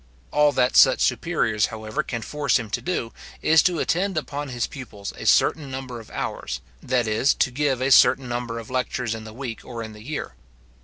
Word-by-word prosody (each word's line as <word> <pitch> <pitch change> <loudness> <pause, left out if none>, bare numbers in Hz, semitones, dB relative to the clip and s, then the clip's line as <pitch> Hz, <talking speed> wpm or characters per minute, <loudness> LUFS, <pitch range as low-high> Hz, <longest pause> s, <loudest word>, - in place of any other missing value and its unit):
All 150 0 +4
that 125 -1 +2
such 130 -1 +7
superiors, 120 -5 +1
however, 110 +5 -3
can 115 -6 -5
force 150 -1 +1
him 115 -5 -6
to - - -1
do, 170 -10 -3 0.3
is 160 0 +6
to 180 -1 +1
attend 185 +3 0
upon 145 -1 -3
his 120 -2 -1
pupils 105 -7 -8
a - - -6
certain 150 -4 +3
number 130 -2 -6
of 110 - -13
hours, - - -4 0.2
that 125 -2 +1
is, 110 +6 +2
to 130 - +1
give 135 -1 0
a 135 +1 +1
certain 130 0 +6
number 120 -1 -3
of 115 +1 -8
lectures 125 -2 -1
in 110 0 -7
the 110 - -9
week, 120 -2 -6
or 115 -2 -6
in 110 -1 -8
the 105 - -12
year. 150 +5 -5
125 Hz, 205 wpm, -24 LUFS, 115-145 Hz, 0.3 s, such